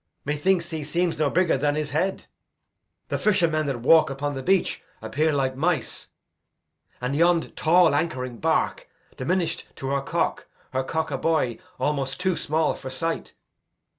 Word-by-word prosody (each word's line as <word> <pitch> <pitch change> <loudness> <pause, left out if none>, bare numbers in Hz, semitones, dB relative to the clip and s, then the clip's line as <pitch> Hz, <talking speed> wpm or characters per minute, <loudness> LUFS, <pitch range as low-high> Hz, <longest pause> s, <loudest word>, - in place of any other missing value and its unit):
Methinks 170 +4 +1
he 160 -2 -3
seems 170 +2 -1
no 150 -2 +3
bigger 170 -3 +2
than 145 +1 +1
his 150 -1 -2
head. 185 +6 -1 0.8
The - - -1
fishermen 170 -7 +2
that 130 -4 -2
walk 160 +5 +6
upon 140 +1 -3
the 135 - -4
beach 190 +7 +1 0.2
Appear 155 +2 0
like 135 -2 0
mice; 155 -2 -1 0.9
and 125 +3 -2
yond 170 +1 +2
tall 175 -1 +4
anchoring 130 -6 -1
bark, 165 - 0 0.3
Diminish'd 185 -2 -1
to 135 - -5
her 140 0 +1
cock; - - -1 0.3
her 130 0 0
cock, 160 +4 -2
a - - -2
buoy 160 -4 0 0.2
Almost 135 -1 -1
too 185 -1 +1
small 155 0 +1
for 130 - -8
sight. 165 +6 -3
155 Hz, 155 wpm, -25 LUFS, 140-170 Hz, 0.9 s, walk